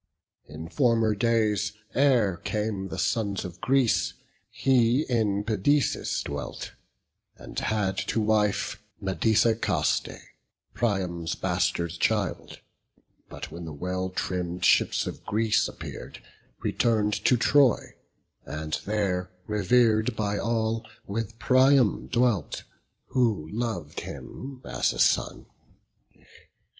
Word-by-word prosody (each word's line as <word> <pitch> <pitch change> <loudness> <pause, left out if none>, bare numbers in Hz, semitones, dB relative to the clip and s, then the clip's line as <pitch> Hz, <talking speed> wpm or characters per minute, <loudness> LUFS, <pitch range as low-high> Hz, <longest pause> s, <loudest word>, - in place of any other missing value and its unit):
In 75 +2 -8
former 115 - +2
days, 105 -2 +1 0.2
ere 120 -10 +3
came 105 -1 -2
the 85 - -6
sons 100 -5 -1
of 90 0 -9
Greece, 130 -3 +2 0.3
He 130 +1 +3
in 105 -5 +1
Pedaeus 110 +7 +1
dwelt, 70 0 -5 0.7
and - - -6
had 105 -3 0
to - - 0
wife 105 -1 +1 0.2
Medesicaste, 105 -3 +1 0.6
Priam's 90 -7 -1
bastard 90 -2 0
child; 105 -3 -1 0.7
But - - -8
when 85 +1 -7
the 80 - -7
well 90 +4 -3
trimm'd 90 -1 -2
ships - - +3
of - - -7
Greece 110 0 +1
appear'd, - - -8 0.4
Return'd 110 -3 +1
to 125 - +5
Troy; 135 0 +3 0.5
and 75 0 -4
there, 95 -4 0 0.2
rever'd 110 +2 +2
by 105 -1 -1
all, 115 -1 0 0.2
With 110 +2 -4
Priam 130 -2 +4
dwelt, 120 - 0 0.5
who 110 -11 +1
lov'd 110 -10 -3
him 130 -1 -8
as - - 0
a - - -8
son. - - +2
105 Hz, 105 wpm, -27 LUFS, 95-115 Hz, 0.7 s, to